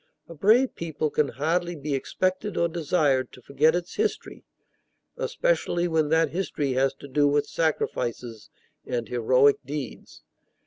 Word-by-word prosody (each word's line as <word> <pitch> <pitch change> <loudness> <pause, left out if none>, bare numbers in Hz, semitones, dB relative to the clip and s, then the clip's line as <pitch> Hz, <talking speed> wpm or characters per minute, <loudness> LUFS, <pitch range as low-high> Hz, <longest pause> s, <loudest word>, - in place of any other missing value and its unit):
A 170 - -10
brave 220 - +3
people 155 -2 -3
can 150 - +1
hardly 170 +5 -1
be 150 -1 -4
expected 185 +8 -2
or 170 - +3
desired 150 -6 0
to 125 - -14
forget 155 +5 +2
its 175 0 -4
history, 430 0 -2 0.7
especially - - 0
when 160 -3 +1
that 160 -2 +2
history 155 -6 -2
has 135 +1 +1
to 140 - -12
do 145 +2 +2
with 145 0 +2
sacrifices 120 -7 -2 0.3
and 120 -2 -3
heroic 125 +4 +3
deeds. 140 0 -7
150 Hz, 140 wpm, -25 LUFS, 135-175 Hz, 0.7 s, brave